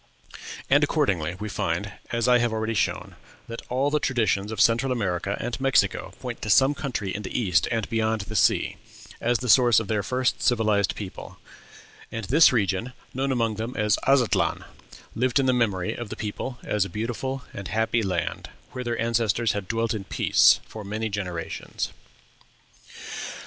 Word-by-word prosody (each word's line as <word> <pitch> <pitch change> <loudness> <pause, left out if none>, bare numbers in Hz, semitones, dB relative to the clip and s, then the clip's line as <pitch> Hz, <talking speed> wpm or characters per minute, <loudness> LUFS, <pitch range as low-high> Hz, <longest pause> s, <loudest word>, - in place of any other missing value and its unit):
And, - - +4
accordingly, 85 -3 0
we 105 - -4
find, 100 -1 -2 0.2
as 115 0 0
I 125 -1 +5
have 120 -1 +1
already 110 0 -1
shown, 105 - -1 0.3
that 115 0 -6
all 135 +3 +1
the 150 - +2
traditions 110 -6 0
of 110 - -5
Central 115 +3 +3
America 100 -4 -1
and 120 +2 -4
Mexico 135 0 +2
point - - -6
to 110 - -4
some 135 +7 +5
country 120 -9 -3
in 105 - -4
the 100 +4 -3
East, 95 -8 +2
and 115 -3 -1
beyond 110 -1 0
the 110 +2 -7
sea, - - +2 0.4
as 120 +1 +2
the 125 - -5
source 120 -1 +6
of 115 - -5
their 105 -2 +1
first 125 +4 -1
civilized 110 -5 +2
people; 100 -3 -8 0.7
and 115 -2 -4
this 150 - +6
region, 110 +1 0 0.2
known 135 +1 -1
among 115 -4 0
them 115 +3 -4
as 105 -1 +2
"Aztlan," 135 -4 +2 0.5
lived 125 +4 +1
in 135 - +2
the 130 - +3
memory 100 -7 0
of 120 -3 -6
the - - -5
people 115 +4 -5
as 105 -2 +1
a 100 - -5
beautiful 120 +4 -4
and 100 -1 -6
happy 110 +2 +1
land, 90 -5 -2 0.2
where 125 - -5
their 120 -1 -2
ancestors 115 -1 +1
had 100 -2 -4
dwelt 115 0 0
in 105 -3 -5
peace - - +4
for 110 - -8
many 110 +2 -3
generations. 90 -5 -4
110 Hz, 175 wpm, -25 LUFS, 100-125 Hz, 0.7 s, source